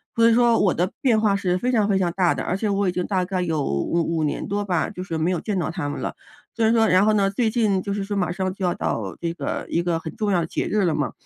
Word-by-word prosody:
所 230 Hz, 0 st, +5 dB
以 -, -, +4 dB
说 235 Hz, -1 st, +4 dB
我 190 Hz, -, +3 dB
的 180 Hz, +3 st, -1 dB
变 235 Hz, -5 st, +3 dB
化 210 Hz, -2 st, +2 dB
是 180 Hz, -2 st, 0 dB
非 250 Hz, +7 st, -1 dB
常 215 Hz, -4 st, +2 dB
非 195 Hz, -, +3 dB
常 175 Hz, -2 st, +1 dB
大 180 Hz, -3 st, +2 dB
的， -, -, -4 dB
而 180 Hz, -, -1 dB
且 215 Hz, +1 st, -1 dB
我 200 Hz, -1 st, +1 dB
已 -, -, 0 dB
经 180 Hz, 0 st, -2 dB
大 185 Hz, -3 st, 0 dB
概 185 Hz, 0 st, -2 dB
有 160 Hz, -5 st, -1 dB
5- 165 Hz, -, 0 dB
5 155 Hz, -, 0 dB
年 150 Hz, -, -2 dB
多 205 Hz, +1 st, -1 dB
吧， 175 Hz, -4 st, 0 dB
就 185 Hz, -3 st, -7 dB
是 165 Hz, -4 st, -4 dB
没 160 Hz, +3 st, 0 dB
有 175 Hz, -, -1 dB
见 205 Hz, -4 st, -2 dB
到 165 Hz, -, -1 dB
她 165 Hz, -6 st, -3 dB
们 145 Hz, -, -5 dB
了。 -, -, -4 dB, 0.4 s
虽 230 Hz, -, 0 dB
然 225 Hz, -, +4 dB
说 225 Hz, -1 st, +4 dB
然 185 Hz, +1 st, +4 dB
后 215 Hz, -, +4 dB
呢， 200 Hz, -2 st, +2 dB
最 220 Hz, +3 st, 0 dB
近 215 Hz, -5 st, +1 dB
就 200 Hz, +1 st, -3 dB
是 200 Hz, -1 st, -2 dB
说 205 Hz, 0 st, -3 dB
马 180 Hz, -2 st, 0 dB
上 185 Hz, 0 st, -2 dB
就 190 Hz, -1 st, -3 dB
要 175 Hz, -, +1 dB
到 100 Hz, -4 st, -3 dB
这 170 Hz, -1 st, -2 dB
个 -, -, -4 dB
一 170 Hz, -, 0 dB
个 170 Hz, -2 st, 0 dB
很 160 Hz, -, -8 dB
重 210 Hz, -2 st, -1 dB
要 180 Hz, -, +3 dB
的 165 Hz, -, -3 dB
节 -, -, -2 dB
日 210 Hz, -1 st, +1 dB
了 160 Hz, -3 st, +1 dB
嘛， 145 Hz, -2 st, -1 dB
185 Hz, 330 characters per minute, -23 LUFS, 170-210 Hz, 0.4 s, 所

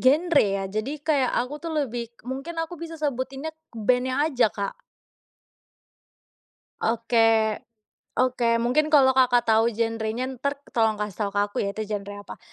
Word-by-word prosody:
genre 295 Hz, +4 st, +4 dB
ya. 195 Hz, -1 st, 0 dB
Jadi, 250 Hz, +9 st, -3 dB
kayak 280 Hz, -5 st, +2 dB
aku 250 Hz, +4 st, -1 dB
tuh 330 Hz, -1 st, -5 dB
lebih 235 Hz, -1 st, -5 dB, 0.2 s
mungkin 275 Hz, +7 st, -5 dB
aku 325 Hz, +2 st, -4 dB
bisa 330 Hz, -1 st, -6 dB
sebutinnya 275 Hz, 0 st, -3 dB, 0.3 s
band-nya 255 Hz, +5 st, +1 dB
aja, 250 Hz, -6 st, +3 dB
Kak. 200 Hz, -1 st, -5 dB, 2.0 s
Oke. 225 Hz, -1 st, +2 dB, 0.6 s
Oke, 240 Hz, -2 st, +2 dB
mungkin 260 Hz, +6 st, +2 dB
kalau 265 Hz, -3 st, +7 dB
Kakak 255 Hz, -2 st, +4 dB
tahu 225 Hz, 0 st, +3 dB
genre-nya, 225 Hz, +2 st, -1 dB
entar 275 Hz, +2 st, -2 dB, 0.2 s
tolong 225 Hz, -2 st, +2 dB
kasih 210 Hz, -1 st, -3 dB
tahu -, -, -3 dB
ke 205 Hz, -, +2 dB
aku -, -, -15 dB
ya, -, -, -1 dB
itu 220 Hz, -, -3 dB
genre 205 Hz, -1 st, -5 dB
apa. -, -, -10 dB
245 Hz, 150 wpm, -25 LUFS, 220-275 Hz, 2.0 s, kalau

